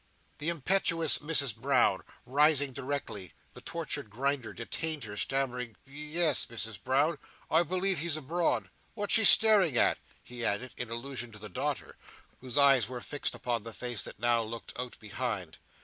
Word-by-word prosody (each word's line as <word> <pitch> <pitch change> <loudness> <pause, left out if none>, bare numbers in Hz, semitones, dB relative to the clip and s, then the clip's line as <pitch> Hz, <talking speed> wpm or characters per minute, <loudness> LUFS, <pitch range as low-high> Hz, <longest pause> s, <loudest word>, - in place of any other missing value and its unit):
The 155 - -1
impetuous 165 0 +3
Mrs 145 -6 +2
Brown 120 -5 +2 0.2
rising 145 +1 +3
directly, 125 -9 -5 0.2
the - - -10
tortured - - -4
Grinder 130 +2 -2
detained 155 +5 -2
her, 105 -2 -7
stammering 125 0 -2
"Ye 150 +3 -7
es, 170 -3 +3
Misses 110 -3 -6
Brown, 140 +4 +1 0.3
I 160 - +5
believe 185 +1 -1
he's 160 0 0
abroad. 165 +4 -1 0.2
What's 205 -2 0
she 225 0 +5
staring 200 - +6
at?" - - +3 0.2
he 120 -1 -8
added, 120 +4 -1
in 120 - -5
allusion 120 +1 -5
to - - -9
the 105 0 -7
daughter, 90 - -4 0.4
whose 130 +1 -5
eyes 135 -5 +5
were 125 -1 -6
fixed 145 +4 -3
upon 120 -2 -1
the 115 +1 -8
face 120 -2 -4
that - - -7
now 120 +1 +2
again 110 - -6
looked 115 +1 -8
out 125 -1 -5
behind. 105 -6 -4
130 Hz, 165 wpm, -30 LUFS, 115-155 Hz, 0.4 s, staring